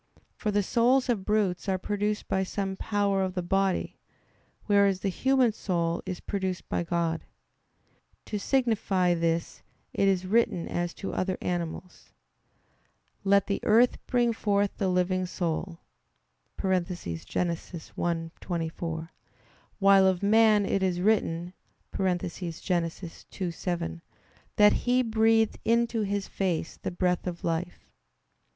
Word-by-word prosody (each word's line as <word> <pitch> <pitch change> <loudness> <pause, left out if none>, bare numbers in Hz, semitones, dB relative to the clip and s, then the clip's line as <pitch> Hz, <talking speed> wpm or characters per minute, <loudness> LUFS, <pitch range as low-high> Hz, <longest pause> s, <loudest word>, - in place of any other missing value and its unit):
For 215 - -2
the 205 0 +2
souls 250 +6 +2
of 220 -6 +1
brutes 205 -3 0
are 190 - +1
produced 210 +2 -2
by 190 - +1
some 190 0 -3
power 200 -1 0
of 190 0 -2
the 180 - -1
body; 195 +1 0 0.7
whereas 200 -2 +3
the 195 - 0
human 260 +4 +2
soul 170 -5 -1
is 185 -2 -4
produced 190 -3 -3
by - - -1
God. 170 -1 -1 1.0
To 210 - -3
signify 200 -7 +1
this 165 0 -1 0.3
it 195 - +2
is 190 -1 +2
written 195 -4 +1
as 175 0 -2
to 195 - -5
other 185 0 -1
animals: 175 0 -5 1.1
"Let 200 0 +4
the 200 - -1
earth 235 +3 +4
bring 240 -2 +2
forth 205 -2 0
the 195 - 0
living 185 0 +1
soul" 170 0 -3 0.8
(Gen. 190 - 0
1:24): 165 - -4 0.7
while 195 -1 +6
of 185 0 +1
man 215 0 +5
it 195 - 0
is 185 -2 0
written 180 -4 +1 0.4
(Gen. 185 -2 +1
2:7) 170 - -4 0.5
that 210 0 +6
"He 250 +1 +2
breathed 225 -1 +2
into 230 0 +2
his 200 -1 -2
face 180 -4 -2
the - - -4
breath 180 0 0
of 175 -1 -5
life." 170 +1 -3
190 Hz, 125 wpm, -28 LUFS, 175-210 Hz, 1.1 s, while